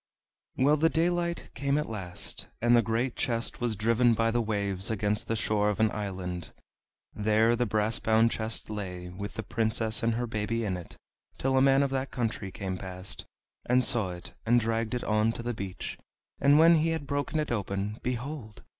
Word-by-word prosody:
Well, 145 +4 +4
the 165 +2 +4
daylight 170 +1 0
came 140 +1 0
at 150 - -1
last, 95 -5 -4
and 120 +1 +4
the 120 - +6
great 115 +3 -1
chest 115 0 -1
was 120 -2 0
driven 115 +3 +3
by 115 +1 +2
the 120 +1 +1
waves 100 -4 -1
against 105 -1 0
the 115 - 0
shore 105 -2 +1
of 105 - -2
an 110 -1 +3
island. 90 -4 -5 0.6
There 110 +2 +3
the 120 0 0
brass 110 +1 +1
bound 110 +1 +3
chest 110 0 -4
lay, 90 -4 -5
with 100 +3 -7
the 110 - -4
Princess 110 +1 0
and 115 -1 +1
her 120 +1 -1
baby 115 0 -2
in 95 -3 -1
it, 90 -2 -9 0.4
till 135 0 0
a 130 - +5
man 135 +1 +5
of 140 - -1
that 135 0 -1
country 110 -5 -3
came 95 -2 -4
past, 95 0 -5 0.4
and 125 +1 +4
saw 110 -7 +4
it, 90 -1 -8
and 120 +1 +4
dragged 115 0 -1
it 125 - -3
on 110 +1 +2
to 120 - -6
the 120 0 -2
beach, 100 -4 -6 0.4
and 140 +1 +5
when 165 +1 +7
he 160 +1 +2
had 160 -3 -2
broken 145 +2 -2
it 150 - -2
open, 100 -1 -2
behold! 125 -2 -5
115 Hz, 195 wpm, -29 LUFS, 105-125 Hz, 0.6 s, when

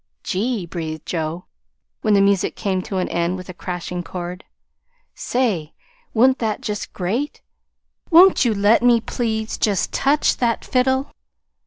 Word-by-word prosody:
"Gee!" 210 0 -1
breathed 160 -2 -6
Joe, 165 +1 -3 0.6
when 215 -2 +3
the 200 - +5
music 200 -1 +2
came 190 -2 -1
to 190 +1 -5
an 185 - 0
end 170 +2 -1
with 185 0 -10
a - - -6
crashing 180 0 -5
chord. 180 +1 -6 0.7
"Say, 210 -12 -1 0.4
wa'n't 260 +4 +4
that 220 -2 -2
just 210 -1 -4
great? 225 +11 -3 0.7
Won't 360 +1 +7
you 230 -4 +1
let 205 +3 +4
me, 240 -1 +5
please, 220 -1 -3
just 205 -3 0
touch 285 +2 +2
that 235 -2 0
fiddle?" 265 +2 +1
205 Hz, 145 wpm, -21 LUFS, 180-240 Hz, 0.7 s, Won't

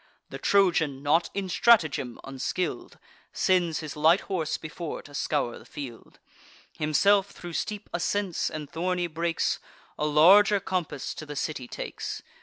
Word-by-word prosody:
The - - -6
Trojan, 165 -8 +2
not 155 +4 +2
in 200 -1 -2
stratagem 160 - +3
unskill'd, 135 +7 -3 0.4
Sends 175 -4 +1
his 155 -2 -6
light 160 +5 +4
horse 170 -5 -2
before 155 +1 -6
to 145 - -14
scour 145 -4 -1
the - - -15
field: 130 -6 -9 0.6
Himself, 195 +6 +3
thro' 175 -3 -9
steep 210 +5 -4
ascents 185 +1 -1
and 155 -1 -6
thorny 175 +3 -1
brakes, 165 0 -1 0.4
A 150 - +1
larger 195 +7 +6
compass 180 -7 -3
to 155 - -8
the 145 - -6
city 140 -3 -3
takes. - - -6
165 Hz, 140 wpm, -27 LUFS, 150-185 Hz, 0.6 s, larger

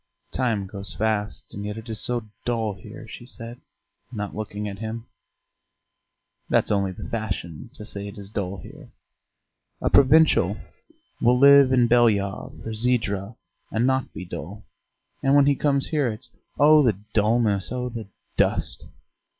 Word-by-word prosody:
"Time 115 -6 0
goes 100 0 -5
fast, 105 -1 -2
and 100 - -6
yet 105 +1 -5
it 110 +1 -9
is 110 -2 +1
so 120 -2 -1 0.2
dull 115 -3 -1
here!" 95 - -11
she - - -10
said, 120 -1 -10 0.5
not 105 -4 -5
looking 105 -1 -4
at 100 -1 -7
him. 110 +1 -5 1.4
"That's - - +2
only 100 -2 +1
the 90 - -8
fashion 110 -6 -5
to 105 - -9
say 100 -1 -2
it 100 - -9
is 100 0 -9
dull 100 -2 -3
here. - - -12 0.9
A - - -1
provincial 155 +4 +5 0.6
will 125 +1 +4
live 140 0 +7
in 125 -2 +4
Belyov 110 -5 +1
or 110 - -4
Zhidra 110 -3 -1 0.3
and 110 +2 0
not 130 0 +1
be 90 - -8
dull, - - -8 0.6
and 135 +1 +3
when 145 -1 +6
he 140 0 +3
comes 140 -1 +1
here 150 -4 +1
it's 115 +3 -6 0.3
'Oh, 150 +1 +7
the 115 -9 +2 0.2
dulness! 105 -2 +2
Oh, 125 0 -2
the 115 -3 -7 0.3
dust!' 60 - 0
110 Hz, 155 wpm, -24 LUFS, 100-125 Hz, 1.4 s, live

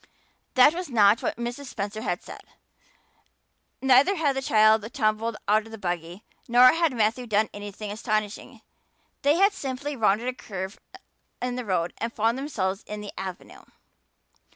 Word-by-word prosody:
That 265 +4 +7
was 360 -1 -5
not 215 -3 +4
what - - -2
Mrs. 240 +4 -5
Spencer 215 -3 -5
had - - -3
said; - - -10 1.4
neither 270 +9 +5
had 295 -6 +1
the 270 - -1
child 220 -2 +3
tumbled 215 -2 0
out 215 +2 +2
of - - -14
the 225 - -7
buggy 175 0 -4 0.2
nor 245 +1 +7
had 330 -1 +2
Matthew 235 +1 0
done 215 0 +1
anything 205 0 -7
astonishing. 215 -1 -3 0.6
They 290 +2 +3
had 395 +3 +4
simply 280 0 -4
rounded 220 0 +1
a 255 - -1
curve 190 -5 -7 0.6
in 250 0 -3
the 250 -1 -4
road 180 -4 -1
and 230 +1 -2
found 225 +1 +1
themselves 200 -9 -3
in 210 0 -6
the 205 - -8
"Avenue." 190 -2 -8
225 Hz, 155 wpm, -25 LUFS, 205-255 Hz, 1.4 s, That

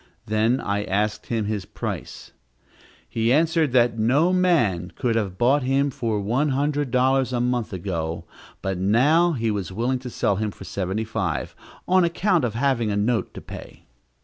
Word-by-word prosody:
Then 110 +4 +1
I 100 -3 -1
asked 105 +3 -1
him 115 -3 -1
his 105 -2 -2
price. - - -6 0.8
He 115 +1 0
answered 160 0 +2
that 120 -2 +3
no 145 +11 +3
man 120 - +2
could 120 -4 0
have 100 -5 -1
bought 135 +6 +3
him 135 +2 +1
for 115 -4 -2
one 120 +9 0
hundred 145 +1 0
dollars 130 0 +2
a 125 - 0
month 120 -1 -1
ago, 85 -3 -4 0.4
but 95 -2 -2
now 145 - +3
he 115 -5 -1
was 100 -5 -3
willing 120 +6 -1
to 125 0 -7
sell 100 -3 0
him 110 0 -1
for 100 - -11
seventy 95 +3 -3
five, 105 -7 -3 0.3
on 185 0 +4
account 175 0 +1
of 115 -3 -1
having 120 -3 +1
a 100 - -1
note 115 +2 0
to - - -7
pay. - - -11
120 Hz, 175 wpm, -23 LUFS, 105-135 Hz, 0.8 s, on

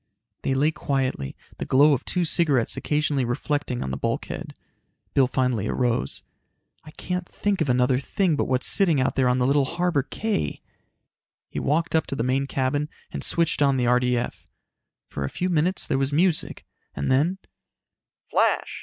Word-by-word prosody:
They 135 - 0
lay 150 +4 +3
quietly, 130 - -2 0.2
the - - -3
glow 145 +3 +5
of 135 - -1
two 180 -1 0
cigarettes 150 -8 +2
occasionally 150 -2 0
reflecting 125 +1 -2
on 65 - -4
the 65 - -3
bulkhead. - - -4 0.6
Bill 135 -2 +4
finally 125 -5 0
arose. 120 - -1 0.6
"I 155 - -12
can't 180 +3 -5
think 205 -3 -1
of 150 - 0
another 125 +1 +3
thing 170 +4 0
but - - 0
what's 130 -1 0
sitting 170 -8 +4
out 130 - 0
there 130 -2 +2
on 125 0 +2
Little 135 +3 +3
Harbor 170 -1 0
Cay!" 145 - -3 0.9
He - - -3
walked 165 +4 0
up 160 - +2
to - - -3
the 115 - -1
main 135 +2 0
cabin 140 +3 -1 0.2
and - - -5
switched 170 -3 +1
on 140 -2 +3
the 125 - +1
RDF. 125 0 0 0.6
For 70 - -5
a 70 - -2
few 180 - -2
minutes 175 +2 +1
there 135 - 0
was 135 +1 0
music, 165 +2 0 0.3
and 70 - -1
then: 155 +8 +2 0.9
"Flash! - - +1
140 Hz, 170 wpm, -24 LUFS, 125-160 Hz, 0.9 s, glow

